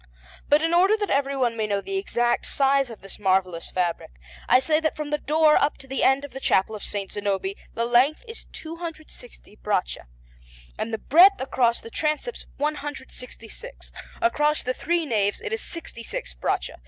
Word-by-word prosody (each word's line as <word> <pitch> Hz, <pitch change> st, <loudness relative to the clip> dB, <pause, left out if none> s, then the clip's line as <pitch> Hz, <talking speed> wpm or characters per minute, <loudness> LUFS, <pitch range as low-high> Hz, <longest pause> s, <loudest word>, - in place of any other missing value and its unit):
But 295 Hz, +2 st, +5 dB
in 330 Hz, +1 st, +1 dB
order 380 Hz, +5 st, +5 dB
that 410 Hz, -2 st, -2 dB
everyone 275 Hz, -4 st, +1 dB
may 220 Hz, -1 st, -1 dB
know 200 Hz, -1 st, 0 dB
the 385 Hz, -, -3 dB
exact 240 Hz, -10 st, 0 dB
size 275 Hz, -1 st, +2 dB
of 230 Hz, -, -10 dB
this 195 Hz, -, -10 dB
marvellous 185 Hz, -4 st, +1 dB
fabric, 175 Hz, -2 st, -1 dB, 0.4 s
I -, -, +8 dB
say 305 Hz, +4 st, +2 dB
that 315 Hz, -1 st, -1 dB
from 300 Hz, -1 st, -5 dB
the 295 Hz, -, +1 dB
door 305 Hz, +1 st, +4 dB
up 290 Hz, -, +2 dB
to -, -, -12 dB
the 270 Hz, 0 st, -2 dB
end 270 Hz, +2 st, +4 dB
of 285 Hz, -, -11 dB
the 265 Hz, -, -7 dB
Chapel 215 Hz, -4 st, +2 dB
of 210 Hz, -, -8 dB
S. 205 Hz, -1 st, -3 dB
Zanobi 200 Hz, -1 st, -2 dB, 0.2 s
the 230 Hz, -, 0 dB
length 250 Hz, -, +3 dB
is 455 Hz, -, -8 dB
260 315 Hz, -, -8 dB
braccia, -, -, -2 dB, 0.7 s
and 230 Hz, -, -2 dB
the 220 Hz, -, -1 dB
breadth 360 Hz, -, +6 dB
across 245 Hz, -3 st, +1 dB
the 230 Hz, -, -11 dB
transepts 305 Hz, +10 st, -2 dB
166; 290 Hz, -, -6 dB, 0.3 s
across 300 Hz, -3 st, +2 dB
the 255 Hz, -, -1 dB
three 335 Hz, +4 st, 0 dB
naves 205 Hz, -6 st, +1 dB
it 425 Hz, -, -5 dB
is 450 Hz, -, -1 dB
66 235 Hz, -, -5 dB
braccia. -, -, -2 dB
270 Hz, 180 wpm, -25 LUFS, 220-310 Hz, 0.7 s, I